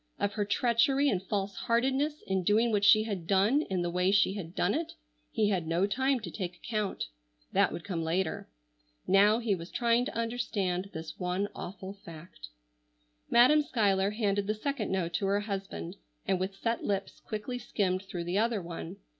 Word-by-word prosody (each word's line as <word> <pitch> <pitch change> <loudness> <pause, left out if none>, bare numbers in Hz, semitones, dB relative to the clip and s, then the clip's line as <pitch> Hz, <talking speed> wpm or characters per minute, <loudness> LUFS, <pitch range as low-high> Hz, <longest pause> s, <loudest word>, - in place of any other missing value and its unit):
Of 200 0 0
her 210 -2 -1
treachery 245 +6 +3
and 185 -6 0
false 195 0 -2
heartedness 270 +6 0
in 190 -1 0
doing 220 +6 +3
what 205 -2 +1
she 215 +1 +7
had 195 -7 -4
done 200 - +3
in 185 -2 0
the 175 - -1
way 180 +1 +2
she 195 -1 +4
had 180 -4 -7
done 180 - +1
it, 320 +2 -2 0.4
he 210 -1 +1
had 180 -5 -1
no 170 +4 +2
time 265 +5 +1
to 180 -5 -6
take 180 -2 -4
account. 210 0 -3 0.5
That - - +3
would 170 - -6
come 175 -5 -3
later. 170 - -1 0.6
Now 205 +3 +5
he 230 -3 0
was 170 -2 -5
trying 235 0 +2
to - - -5
understand 205 -6 -1
this 160 -1 -7
one 180 +3 -1
awful 190 +1 -7
fact. 165 - -12 0.8
Madam 255 +6 +6
Schuyler 200 -8 +1
handed 205 -2 0
the 215 - 0
second 260 0 -2
note 175 -3 -1
to 195 +3 0
her 200 +1 +2
husband, 195 - -5 0.3
and 190 - +2
with 190 +1 -3
set 230 +3 -2
lips 195 -1 -2
quickly 220 +4 -5
skimmed 185 -5 -1
through 190 -3 -5
the 175 +4 0
other 230 -1 +1
one. 170 - -7
200 Hz, 185 wpm, -30 LUFS, 185-230 Hz, 0.8 s, she